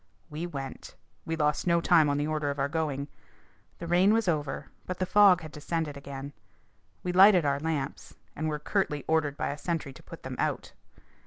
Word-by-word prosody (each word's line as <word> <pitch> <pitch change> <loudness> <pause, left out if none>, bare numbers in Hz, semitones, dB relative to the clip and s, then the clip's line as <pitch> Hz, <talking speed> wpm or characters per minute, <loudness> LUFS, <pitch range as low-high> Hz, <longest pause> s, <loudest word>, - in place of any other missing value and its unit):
We 160 +4 -4
went. 135 -5 -7 0.3
We 165 - -1
lost 150 +2 0
no 170 -1 +4
time 160 -2 +4
on 145 - +1
the 145 - 0
order 155 -1 -1
of 140 - -3
our 140 0 +1
going. 145 -2 -2 0.7
The 170 - -7
rain 180 +4 +4
was 225 -2 +1
over, 150 -5 -2 0.2
but 185 - -3
the 185 - 0
fog 190 -1 +6
had 155 -1 -9
descended 155 0 -3
again. 140 0 -8 0.7
We 180 - -1
lighted 185 -2 +7
our 140 0 +1
lamps, 150 -3 -4 0.2
and 155 +1 -2
were 150 - -2
curtly 150 -2 -1
ordered 155 -3 +1
by - - -1
a 145 +1 -5
sentry 165 -5 -3
to - - -14
put - - -12
them - - -6
out. - - -2
155 Hz, 195 wpm, -28 LUFS, 145-175 Hz, 0.7 s, lighted